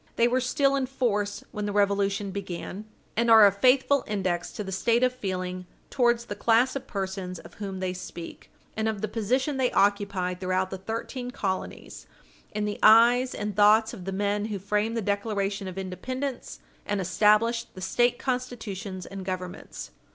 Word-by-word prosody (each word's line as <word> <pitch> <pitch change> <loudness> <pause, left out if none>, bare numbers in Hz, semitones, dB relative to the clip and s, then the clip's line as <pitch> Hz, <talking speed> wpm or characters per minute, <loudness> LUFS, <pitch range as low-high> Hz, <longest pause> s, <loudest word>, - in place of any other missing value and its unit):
They 235 - +4
were 255 +2 +1
still 275 +2 +2
in 270 -2 0
force 210 -6 -1
when 210 0 -3
the - - -2
Revolution 200 0 +1
began, 195 +1 -6 0.3
and 235 +1 +2
are 220 -2 +9
a 200 - +6
faithful 260 +6 +3
index 185 -4 -2
to 210 - -4
the 190 - -6
state 235 +5 +2
of 255 0 +3
feeling 185 -5 -4 0.2
towards 240 -2 +2
the 205 - -5
class 235 +5 +3
of 275 - -5
persons 190 -2 -4
of - - -13
whom 195 -2 -4
they 185 -1 -1
speak, 175 -2 -9 0.3
and 220 0 0
of 210 -3 -4
the 215 - -1
position 255 +7 0
they 255 -2 +2
occupied 200 -3 +1
throughout 185 0 0
the 190 - -5
thirteen 230 +5 -5
colonies, 190 -6 -5 0.4
in 210 0 -2
the 205 0 -3
eyes 240 +4 +6
and 210 -1 -4
thoughts 215 +2 +5
of 190 -7 -9
the 195 - -3
men 205 +1 0
who 215 -2 -3
framed 210 +4 -1
the 225 - -1
Declaration 200 -1 -1
of 185 0 -7
Independence 250 +8 -5 0.2
and 205 -1 -2
established 215 +5 +2
the - - -8
State 240 +6 +2
Constitutions 220 -7 -4
and 195 0 -7
Governments. 185 -1 -6
205 Hz, 175 wpm, -27 LUFS, 190-235 Hz, 0.4 s, are